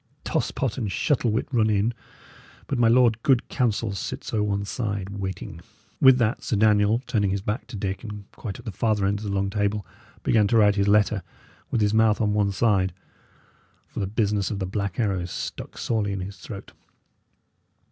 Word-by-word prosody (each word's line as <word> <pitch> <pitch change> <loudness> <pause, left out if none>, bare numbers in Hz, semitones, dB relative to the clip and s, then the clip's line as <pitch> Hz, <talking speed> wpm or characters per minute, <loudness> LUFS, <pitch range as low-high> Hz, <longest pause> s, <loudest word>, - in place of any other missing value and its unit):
Toss - - 0
pot 130 -1 -2
and 105 -5 -2
Shuttle 125 +5 +1
wit 110 +2 0
run 110 -4 +3
in, 105 +3 +2 0.7
but 135 - -2
my 115 - +5
Lord 115 -1 +4
Good 130 -3 +3
Counsel 115 -3 0
sits 100 - -5
o' 110 - +2
one 100 -1 -1
side, 100 -3 -3
waiting." 95 -2 -6 0.4
With 130 -1 +7
that, 115 -2 +1
Sir - - -1
Daniel, 105 +2 +3
turning 105 -5 +1
his 95 0 -2
back 105 +6 -3
to 120 - -8
Dick, 95 +1 -3
and 105 -2 -7
quite 100 -5 -7
at - - -13
the 110 - -4
farther 105 +1 +1
end 100 +1 +1
of 105 - -7
the 100 - -2
long 100 0 0
table, 105 0 -1 0.4
began 105 -2 +3
to 115 - +3
write 105 -2 +5
his 100 0 +1
letter, 105 0 +3 0.5
with 115 - 0
his 105 0 +2
mouth 110 -1 +4
on 105 -2 +1
one 105 -1 +2
side, 95 -3 +2 0.9
for - - -8
this 95 - -2
business 105 -2 0
of 105 - -3
the 95 - -2
Black 100 +2 -3
Arrow 95 -6 0
stuck 90 - -6
sorely 105 -3 -1
in 100 - -3
his 100 +2 -7
throat. 100 -3 -9
105 Hz, 200 wpm, -25 LUFS, 100-115 Hz, 0.9 s, With